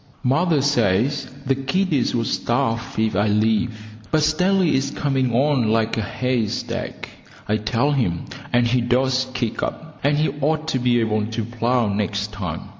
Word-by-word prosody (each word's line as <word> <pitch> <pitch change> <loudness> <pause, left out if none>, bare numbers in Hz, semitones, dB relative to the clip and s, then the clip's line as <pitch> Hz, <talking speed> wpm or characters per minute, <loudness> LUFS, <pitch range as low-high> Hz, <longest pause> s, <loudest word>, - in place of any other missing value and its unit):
Mother 145 +3 +2
says 125 0 +1 0.2
the 135 - +2
kiddies 140 +1 0
would 115 -1 0
starve 115 +1 -1
if 110 -2 +1
I 105 +3 +2
leave; 110 +2 +1 0.3
but 155 +6 +2
Stanley 180 +3 +2
is 135 +1 +1
coming 135 -3 0
on 130 -1 +2
like 110 0 +1
a 110 - -1
haystack, 120 0 -2 0.4
I 105 - +2
tell 115 +6 0
him, 110 - 0 0.3
and 120 0 +3
he 120 +1 +2
does 130 +2 +1
kick 120 -3 -2
up, 160 -1 -5
and 145 +1 +3
he 155 +1 +2
ought 155 +2 0
to 130 - 0
be 120 -1 +2
able 110 -1 0
to 115 -1 -3
plough 120 0 0
next 105 +1 -2
time. 95 -7 -4
125 Hz, 165 wpm, -22 LUFS, 110-140 Hz, 0.4 s, and